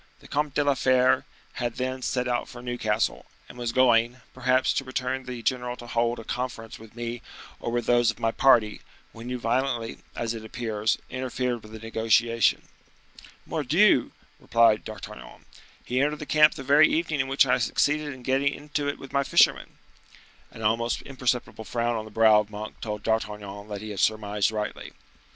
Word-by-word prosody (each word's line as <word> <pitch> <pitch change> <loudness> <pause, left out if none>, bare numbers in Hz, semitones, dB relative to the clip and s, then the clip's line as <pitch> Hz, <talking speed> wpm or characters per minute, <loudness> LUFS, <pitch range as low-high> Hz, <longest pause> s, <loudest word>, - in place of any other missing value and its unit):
The - - -16
Comte 145 -1 -1
de 145 - +3
la 145 -1 +3
Fere 130 -1 +3 0.4
had 120 -1 -2
then 130 0 -3
set 125 0 -1
out 120 -1 -1
for 120 0 -10
Newcastle, 120 -4 -1 0.2
and - - -13
was 120 -1 -3
going, 120 -1 +3
perhaps, 130 +1 +2
to - - -1
bring 130 0 -3
the 125 -2 -7
general 125 -1 -1
to 120 - -11
hold 120 0 0
a 115 - -8
conference 120 -2 -5
with 110 0 -15
me 120 0 -5 0.4
or 120 - -4
with 120 -1 -1
those 120 -1 +4
of 115 - -2
my 115 - +1
party, 115 -4 +3 0.3
when 115 +2 -9
you 125 - -2
violently, 120 0 -1 0.2
as 115 -1 -2
it 110 -1 -7
appears, 110 -1 -1
interfered 125 -1 -2
with 110 - -14
the 110 - -8
negotiation." 115 +1 +2 0.8
"Mordioux!" - - +3 0.3
replied 115 -2 +3
D'Artagnan, 110 -2 -10 0.4
"he 125 +2 0
entered 150 +2 +1
the 150 - -7
camp 150 +1 +5
the 135 - -7
very 145 +3 +6
evening 160 -2 -1
in 130 - 0
which 135 +1 +4
I 125 -1 +2
succeeded 150 +5 +1
in 130 -2 -11
getting 135 +2 +1
into 145 0 -4
it 145 - -2
with 135 - -12
my 140 0 +2
fishermen—" - - +3 0.7
An 115 - -10
almost 115 +2 0
imperceptible 125 -4 -2
frown 120 +1 -1
on 110 -1 -4
the - - -10
brow 110 0 +5
of 105 -1 -3
Monk 105 +1 -8
told 105 -2 -5
D'Artagnan 105 -2 -3
that 105 -1 -6
he 110 0 -6
had 100 - -5
surmised 105 -1 +1
rightly. 105 -1 -5
120 Hz, 185 wpm, -26 LUFS, 110-130 Hz, 0.8 s, very